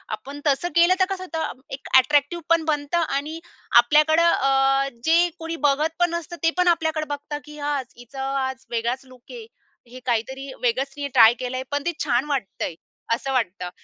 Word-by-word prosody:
आपण 275 Hz, +7 st, -10 dB
तसं 285 Hz, +5 st, +1 dB
केलं 345 Hz, +2 st, +6 dB
तर 375 Hz, -, +5 dB
कसं 380 Hz, -1 st, -4 dB
होतं 320 Hz, -7 st, -5 dB
एक 270 Hz, +1 st, -7 dB
अ‍ॅट्रॅक्टिव्ह 285 Hz, +5 st, +4 dB
पण 335 Hz, -1 st, +4 dB
बनतं 300 Hz, +1 st, 0 dB, 0.2 s
आणि 305 Hz, +4 st, -3 dB, 0.4 s
आपल्याकडं 305 Hz, +6 st, +4 dB
अ, 270 Hz, -3 st, +3 dB
जे 340 Hz, +2 st, +4 dB
कोणी 330 Hz, 0 st, -4 dB
बघत 295 Hz, +3 st, +2 dB
पण 350 Hz, 0 st, +3 dB
नसतं. 340 Hz, 0 st, -4 dB
ते 330 Hz, -, +5 dB
पण 360 Hz, 0 st, +2 dB
आपल्याकडे 320 Hz, -2 st, +1 dB
बघतं 290 Hz, +1 st, -4 dB
की, 300 Hz, 0 st, -12 dB
"आज 285 Hz, -2 st, -2 dB
हिचं 245 Hz, +3 st, -11 dB
आज 265 Hz, -1 st, -3 dB
वेगळाच 240 Hz, +3 st, -2 dB
लूक 255 Hz, -1 st, -17 dB
आहे. 470 Hz, -3 st, -9 dB, 0.4 s
हे 250 Hz, +2 st, -11 dB
काहीतरी 265 Hz, +3 st, -2 dB
वेगळंच 260 Hz, +3 st, 0 dB
तिने 285 Hz, -1 st, -3 dB
ट्राय 240 Hz, -4 st, +6 dB
केलं 255 Hz, 0 st, -3 dB
आहे. 260 Hz, -, -3 dB
पण 285 Hz, 0 st, -1 dB
ते 345 Hz, -, +1 dB
छान 255 Hz, -2 st, +1 dB
वाटतंय" 245 Hz, -, -3 dB, 0.4 s
असं 270 Hz, +4 st, -2 dB
वाटतं. 190 Hz, -7 st, -1 dB
280 Hz, 180 wpm, -23 LUFS, 260-320 Hz, 0.4 s, केलं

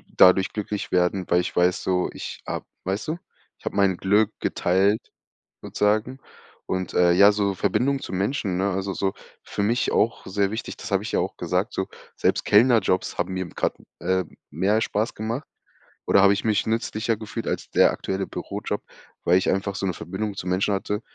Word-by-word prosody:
dadurch 95 Hz, +1 st, +6 dB
glücklich 105 Hz, -1 st, -4 dB
werden, 90 Hz, +1 st, +1 dB
weil 90 Hz, +1 st, +4 dB
ich 90 Hz, -, -5 dB
weiß 90 Hz, +2 st, +2 dB
so, 90 Hz, -1 st, +1 dB
ich -, -, -7 dB
habe -, -, -4 dB, 0.2 s
weißt 95 Hz, +9 st, -2 dB
du, 160 Hz, -, -1 dB, 0.4 s
ich -, -, -23 dB
habe -, -, -3 dB
mein 95 Hz, -3 st, +3 dB
Glück 105 Hz, +3 st, +3 dB
geteilt 95 Hz, +4 st, +1 dB, 0.5 s
sozusagen. 110 Hz, +5 st, 0 dB, 0.5 s
Und, 95 Hz, -1 st, -2 dB
äh, 90 Hz, -1 st, +5 dB
ja, 100 Hz, +3 st, +7 dB
so 100 Hz, -1 st, 0 dB
Verbindungen 125 Hz, +9 st, +1 dB
zu -, -, -7 dB
Menschen, 95 Hz, -1 st, -1 dB
ne 100 Hz, +2 st, +1 dB
also 95 Hz, +1 st, -2 dB
so 95 Hz, -1 st, -1 dB, 0.3 s
für 100 Hz, -, -4 dB
mich 115 Hz, +4 st, +1 dB
auch 115 Hz, +2 st, +1 dB
sehr 100 Hz, +1 st, 0 dB
wichtig, 110 Hz, +2 st, -5 dB
das 110 Hz, -, -8 dB
habe 100 Hz, -1 st, +2 dB
ich 110 Hz, -, -5 dB
ja -, -, +2 dB
auch -, -, -3 dB
gesagt, -, -, -1 dB
so, -, -, -2 dB, 0.3 s
selbst -, -, +1 dB
Kellnerjobs 110 Hz, -4 st, +3 dB
haben -, -, -1 dB
mir 95 Hz, 0 st, -2 dB
gra -, -, -1 dB, 0.3 s
ähm, 95 Hz, +1 st, -1 dB
mehr 105 Hz, +3 st, +1 dB
Spaß 110 Hz, 0 st, -1 dB
gemacht 115 Hz, +7 st, -3 dB, 0.6 s
oder 100 Hz, -, +5 dB
habe 100 Hz, 0 st, +6 dB
ich 100 Hz, -, -2 dB
mich 110 Hz, -1 st, +1 dB
nützlicher 110 Hz, 0 st, -1 dB
gefühlt 110 Hz, +1 st, -6 dB
als -, -, -3 dB
der -, -, +5 dB
aktuelle 95 Hz, 0 st, -3 dB
Bürojob, -, -, -4 dB, 0.4 s
weil 90 Hz, +2 st, +4 dB
ich -, -, -1 dB
einfach 95 Hz, +1 st, -1 dB
so 100 Hz, -, -2 dB
'ne 90 Hz, -, 0 dB
Verbindung 100 Hz, +5 st, -4 dB
zu 90 Hz, -, -6 dB
Menschen 95 Hz, +3 st, +1 dB
hatte. 105 Hz, +2 st, -2 dB
100 Hz, 190 wpm, -24 LUFS, 95-110 Hz, 0.6 s, ja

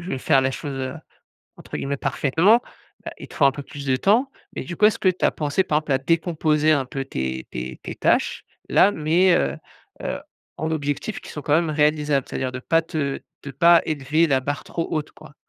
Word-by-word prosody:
veux 135 Hz, -7 st, -4 dB
faire 135 Hz, +1 st, +3 dB
les 130 Hz, -, +1 dB
choses, 145 Hz, +2 st, -5 dB
heu, 130 Hz, 0 st, -4 dB, 0.6 s
entre -, -, -8 dB
guillemets, 140 Hz, +1 st, -2 dB
«parfaitement» 175 Hz, -, +3 dB, 0.5 s
heu, -, -, -3 dB
il -, -, -10 dB
te -, -, -13 dB
faut 145 Hz, -, +2 dB
un 135 Hz, -, +5 dB
peu 145 Hz, -, -7 dB
plus 140 Hz, +1 st, -9 dB
de 130 Hz, -, +2 dB
temps. 230 Hz, -, +2 dB, 0.3 s
Mais -, -, -4 dB
du 170 Hz, -, -6 dB
coup 210 Hz, -, +5 dB
est-ce 215 Hz, -, +2 dB
que 190 Hz, -, +2 dB
tu 185 Hz, -, 0 dB
as -, -, +5 dB
pensé 150 Hz, +5 st, 0 dB
par 150 Hz, -4 st, 0 dB
exemple 155 Hz, -2 st, -3 dB
à 130 Hz, -, +3 dB
décomposer 155 Hz, 0 st, +1 dB
un 140 Hz, -4 st, +1 dB
peu 135 Hz, +1 st, -4 dB
tes 65 Hz, -, -4 dB
tes 65 Hz, +1 st, -5 dB
tes -, -, -6 dB
tâches-là, 200 Hz, -, +1 dB
mais 170 Hz, +3 st, +3 dB
heu 70 Hz, +1 st, 0 dB, 0.5 s
heu, -, -, -3 dB, 0.4 s
en 160 Hz, +1 st, -3 dB
objectifs 145 Hz, +7 st, -3 dB
qui -, -, -11 dB
sont 150 Hz, -, -7 dB
quand 150 Hz, -, +1 dB
même 165 Hz, -1 st, +2 dB
réalisables, 150 Hz, -2 st, +1 dB
c'est-à-dire 130 Hz, -, -3 dB
de 130 Hz, -, -5 dB
pas 165 Hz, +4 st, +2 dB
te 150 Hz, -4 st, -3 dB, 0.2 s
de 140 Hz, -, -6 dB
pas 170 Hz, +5 st, +6 dB
élever 155 Hz, +2 st, +1 dB
la 135 Hz, -3 st, +2 dB
barre 145 Hz, +1 st, -4 dB
trop 165 Hz, -, -4 dB
haute 155 Hz, -1 st, -3 dB
quoi? 155 Hz, -1 st, -15 dB
150 Hz, 220 wpm, -23 LUFS, 135-165 Hz, 0.6 s, pas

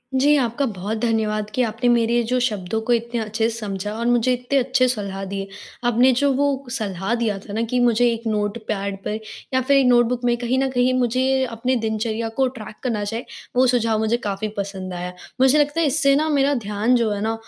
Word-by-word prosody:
जी, 290 Hz, +3 st, +4 dB
आपका 240 Hz, +3 st, -1 dB
बहुत 210 Hz, -1 st, -3 dB
धन्यवाद 215 Hz, -2 st, 0 dB
कि 255 Hz, -, +2 dB
आपने 230 Hz, +2 st, 0 dB
मेरे 235 Hz, -1 st, +3 dB
ये 240 Hz, -, +3 dB
जो 255 Hz, 0 st, +2 dB
शब्दों 215 Hz, -4 st, -1 dB
को 240 Hz, +2 st, +1 dB
इतने 235 Hz, 0 st, -1 dB
अच्छे 220 Hz, +1 st, -1 dB
से 230 Hz, -, -5 dB
समझा 205 Hz, -2 st, -4 dB
और 235 Hz, -, -3 dB
मुझे 245 Hz, +1 st, +3 dB
इतने 250 Hz, +3 st, -1 dB
अच्छे 255 Hz, 0 st, +2 dB
सलाह 200 Hz, -5 st, -3 dB
दिए। 195 Hz, 0 st, -4 dB, 0.4 s
आपने 245 Hz, +2 st, +4 dB
जो 285 Hz, -1 st, +3 dB
वो 280 Hz, -1 st, 0 dB
सलाह 200 Hz, -2 st, -2 dB
दिया 225 Hz, -4 st, -1 dB
था 200 Hz, +1 st, -10 dB
ना, 225 Hz, -, -1 dB
कि 240 Hz, +2 st, 0 dB
मुझे 245 Hz, 0 st, +3 dB
एक 230 Hz, 0 st, -4 dB
नोटपैड 205 Hz, -2 st, -2 dB
पर 215 Hz, +1 st, -3 dB, 0.3 s
या 260 Hz, -, +3 dB
फिर 280 Hz, +2 st, +3 dB
एक 270 Hz, -, +4 dB
नोटबुक 245 Hz, 0 st, +3 dB
में 240 Hz, 0 st, +3 dB
कहीं 245 Hz, +2 st, -1 dB
न 270 Hz, 0 st, +1 dB
कहीं 250 Hz, 0 st, +2 dB
मुझे 260 Hz, +2 st, +1 dB
अपने 245 Hz, +2 st, -1 dB
दिनचर्या 220 Hz, +1 st, -2 dB
को 265 Hz, -1 st, +3 dB
ट्रैक 215 Hz, -1 st, -9 dB
करना 225 Hz, -5 st, -1 dB
चाहिए 225 Hz, +4 st, -4 dB, 0.3 s
वो 255 Hz, -, +5 dB
सुझाव 230 Hz, -3 st, +1 dB
मुझे 220 Hz, +2 st, +1 dB
काफ़ी 205 Hz, +1 st, -2 dB
पसंद 190 Hz, -2 st, -4 dB
आया। 180 Hz, 0 st, -5 dB, 0.3 s
मुझे 265 Hz, +3 st, +5 dB
लगता 290 Hz, +2 st, +1 dB
है 330 Hz, -, +3 dB
इससे 275 Hz, 0 st, +3 dB
ना 310 Hz, +2 st, +1 dB
मेरा 285 Hz, -1 st, +2 dB
ध्यान 210 Hz, +4 st, +1 dB
जो 230 Hz, -3 st, +1 dB
है 205 Hz, 0 st, -2 dB
ना, 220 Hz, +1 st, 0 dB
230 Hz, 220 wpm, -22 LUFS, 215-255 Hz, 0.4 s, वो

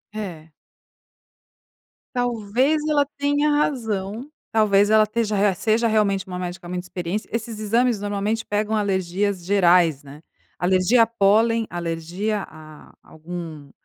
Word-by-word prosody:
É. 165 Hz, -7 st, -7 dB, 1.6 s
Talvez 245 Hz, +4 st, +1 dB
ela 290 Hz, -2 st, +2 dB
tenha 290 Hz, +1 st, +1 dB
razão, 230 Hz, -5 st, -1 dB, 0.2 s
talvez 205 Hz, -2 st, +3 dB
ela 220 Hz, 0 st, +6 dB
esteja 215 Hz, 0 st, -1 dB, 0.2 s
seja 225 Hz, +4 st, +1 dB
realmente 200 Hz, -3 st, +1 dB
uma 180 Hz, -1 st, -5 dB
médica 180 Hz, -1 st, -6 dB
muito 180 Hz, 0 st, -4 dB
experiência, 180 Hz, +3 st, -4 dB
esses 230 Hz, -1 st, -4 dB
exames 230 Hz, +2 st, +1 dB
normalmente 205 Hz, +2 st, -2 dB
pegam 210 Hz, +1 st, -1 dB
alergias 195 Hz, -1 st, -1 dB
gerais, 175 Hz, -6 st, +3 dB
né, 145 Hz, +2 st, -13 dB, 0.4 s
alergia 185 Hz, +6 st, +3 dB
a 225 Hz, -, +5 dB
pólen, 225 Hz, +1 st, +2 dB
alergia 175 Hz, +5 st, -3 dB
a 155 Hz, -1 st, -14 dB
algum 160 Hz, -3 st, -9 dB
205 Hz, 115 wpm, -22 LUFS, 180-225 Hz, 1.6 s, ela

